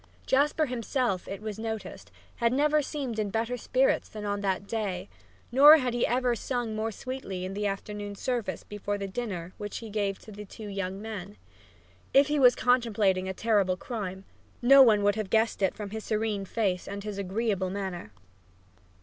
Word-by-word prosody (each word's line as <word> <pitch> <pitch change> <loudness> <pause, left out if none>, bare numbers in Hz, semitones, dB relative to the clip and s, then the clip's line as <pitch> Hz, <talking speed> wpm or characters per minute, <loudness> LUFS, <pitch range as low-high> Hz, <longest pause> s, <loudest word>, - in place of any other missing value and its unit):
Jasper 295 +3 +2
himself, 245 -5 -1
it 195 +2 -6
was 215 -1 -5
noticed, 220 -1 -6 0.3
had 235 -1 +2
never 300 +3 +3
seemed 270 -6 -4
in 210 -1 0
better 225 +4 -1
spirits 255 +2 +1
than 210 -1 -7
on 205 0 -1
that 195 0 -1
day, 200 - -3 0.4
nor 290 +5 +9
had 255 -5 -1
he 240 - +1
ever 245 0 +1
sung 240 -1 -3
more 220 +1 -1
sweetly 220 -5 -6
than 185 +1 -4
in - - -6
the 205 +1 -1
afternoon 205 +1 -5
service 240 0 -3
before 205 0 -4
the 200 -1 -4
dinner 190 -5 -5
which 205 0 -5
he 225 -2 -8
gave 200 -2 -1
to 220 - -13
the 205 0 -8
two 210 +1 -10
young 195 -1 -4
men. 205 -2 -7 0.8
If 275 +1 +6
he 295 0 +1
was 250 -2 +7
contemplating 210 -7 +2
a - - -2
terrible 200 -5 +2
crime, 190 -4 -5 0.4
no 275 +3 +8
one 215 -5 +6
would 205 0 +4
have 215 -3 -3
guessed 220 0 +2
it 190 - +2
from 205 -2 -6
his 220 0 -5
serene 215 -2 -1
face 195 -3 -1
and 200 0 -5
his 205 -1 -5
agreeable 195 -1 -1
manner. 185 - -5
215 Hz, 185 wpm, -28 LUFS, 195-240 Hz, 0.8 s, nor